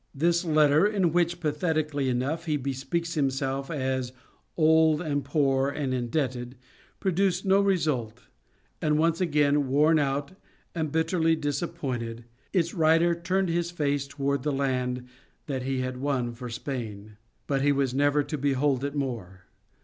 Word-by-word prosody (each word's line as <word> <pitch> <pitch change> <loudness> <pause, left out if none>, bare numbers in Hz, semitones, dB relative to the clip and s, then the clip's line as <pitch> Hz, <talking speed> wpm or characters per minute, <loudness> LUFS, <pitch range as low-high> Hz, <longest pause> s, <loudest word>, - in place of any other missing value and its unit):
This 170 +4 +2
letter 155 +1 +4
in 190 -6 +1
which 175 0 +1
pathetically 150 -3 -1
enough, 135 +7 -1
he 150 -2 +1 0.2
speaks 165 +6 -2
of 155 - 0
himself 135 0 -1
as 130 -4 -2 0.4
"old 160 -1 +4
and 145 -4 -1
poor 135 -1 +1
and 140 -2 -2
indebted," 125 0 -2 0.4
produced 190 0 +1
no 195 +1 +4
result 150 - 0 0.6
and 150 -1 +2
once 165 +2 +2
again, 145 -4 +2
worn 150 +4 +4
out 140 +2 -1 0.4
and 160 -3 -2
bitterly 160 +1 +2
disappointed, 135 -7 -3 0.3
its 170 -3 +1
writer 165 +1 +4
turned 180 +2 -1
his 170 0 0
face 145 -5 -1
toward 140 -1 -1
the 150 +2 -1
land 125 -2 -1 0.4
that 135 -3 -3
he 130 0 -1
had 130 0 -3
won 130 -3 -1
for 125 +1 -7
Spain. 110 -4 -6 0.3
But 135 -1 0
he 145 +1 +3
was 135 -2 0
never 145 +2 +2
to 150 +1 -5
behold 140 -1 +1
it 140 +1 -3
more. 115 -10 -4
145 Hz, 150 wpm, -27 LUFS, 130-160 Hz, 0.6 s, letter